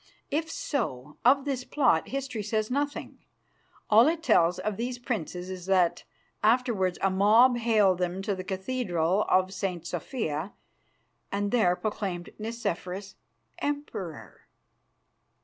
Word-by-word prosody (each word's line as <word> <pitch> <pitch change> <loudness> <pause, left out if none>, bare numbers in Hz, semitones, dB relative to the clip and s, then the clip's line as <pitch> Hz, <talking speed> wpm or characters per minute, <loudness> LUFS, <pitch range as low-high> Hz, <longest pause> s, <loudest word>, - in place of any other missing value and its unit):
If 320 +2 -1
so, 150 - -3
of 270 +3 +5
this 265 -3 -2
plot 250 - +2
history 265 -4 -3
says 215 +2 -1
nothing. 285 +2 -2 0.7
All 225 +5 +6
it 325 0 0
tells 175 - +4
of 215 -1 -2
these 245 +3 -3
princes 185 - -4
is 185 -1 -7
that 185 -3 +2 0.4
afterwards 215 -5 +2
a 195 - +3
mob 220 +6 +5
haled 215 -6 +3
them 180 +1 -2
to 205 0 0
the 185 -1 -5
Cathedral 190 -2 0
of 185 +1 +3
St. 185 -3 -3
Sophia 175 - -3 0.8
and 200 0 -1
there 200 -8 +3
proclaimed 190 -4 -4
Nicephorus 200 -4 -4 0.5
emperor. 285 - -5
205 Hz, 125 wpm, -28 LUFS, 180-245 Hz, 0.8 s, All